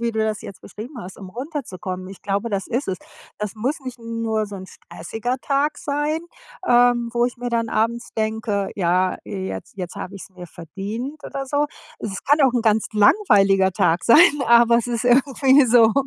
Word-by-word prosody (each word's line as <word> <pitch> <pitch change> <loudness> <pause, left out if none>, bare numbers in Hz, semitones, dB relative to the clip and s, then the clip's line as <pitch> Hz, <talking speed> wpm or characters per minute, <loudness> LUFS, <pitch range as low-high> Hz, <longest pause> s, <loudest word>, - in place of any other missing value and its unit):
wie 235 0 0
du 220 - -4
das 215 -1 -1
jetzt 195 - -10
beschrieben 220 +8 -9
hast, 185 -4 -9
um 195 - -9
runterzukommen. 190 - -6
Ich 195 - -12
glaube, 200 +3 -1
das 200 -3 -2
ist 245 +1 -2
es. 190 - -1 0.4
Das 210 -2 -4
muss 260 +9 -2
nicht 255 -2 -8
nur 230 -2 -2
so 205 -1 -8
‘n 190 0 -9
stressiger 225 +9 -5
Tag 285 +1 0
sein, 295 0 -1 0.5
ähm, 240 -2 +4
wo 240 0 +2
ich 245 - -6
mir 245 0 -4
dann 230 -1 0
abends 230 +2 -1
denke: 215 -2 -1
„Ja, 185 0 +1
jetzt 190 +1 -6
jetzt 180 -2 -6
habe 190 - -6
ich's 200 0 -10
mir 180 -1 -11
verdient“ 205 - -7
oder 275 0 -5
so. 290 +2 +1 0.3
Es 195 -2 -5
kann 290 +2 +3
auch 265 -3 +4
‘n 240 - +1
ganz 220 -1 +2
langweiliger 200 - +4
Tag 170 -1 +1
sein, 235 - +7 0.3
aber 235 0 +6
es 235 - -3
ist 240 -1 -2
irgendwie 265 +2 +4
so, 225 -2 +5
225 Hz, 190 wpm, -22 LUFS, 195-250 Hz, 0.5 s, sein